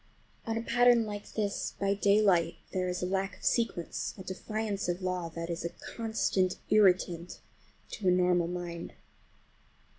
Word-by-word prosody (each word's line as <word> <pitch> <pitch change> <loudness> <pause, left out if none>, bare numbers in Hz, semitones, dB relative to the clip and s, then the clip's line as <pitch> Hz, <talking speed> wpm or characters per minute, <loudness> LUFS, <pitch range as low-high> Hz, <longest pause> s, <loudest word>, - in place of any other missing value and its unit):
On 225 0 -1
a 225 - -2
pattern 240 -1 +4
like 205 -1 -6
this, 205 -2 -2
by 200 0 +2
daylight, 200 -4 +3 0.2
there 185 -1 0
is 180 0 -3
a - - +2
lack 190 +1 -1
of - - -12
sequence, 230 -8 0
a 190 - -8
defiance 205 +1 -3
of 175 +2 -2
law, 180 -2 -2
that 165 0 -4
is 170 +1 -4
a 170 - -1
constant 210 -4 -1 0.2
irritant 180 -4 +3 0.5
to 200 - -3
a - - +6
normal 180 -1 +3
mind. 175 -1 -5
185 Hz, 155 wpm, -30 LUFS, 180-210 Hz, 0.5 s, a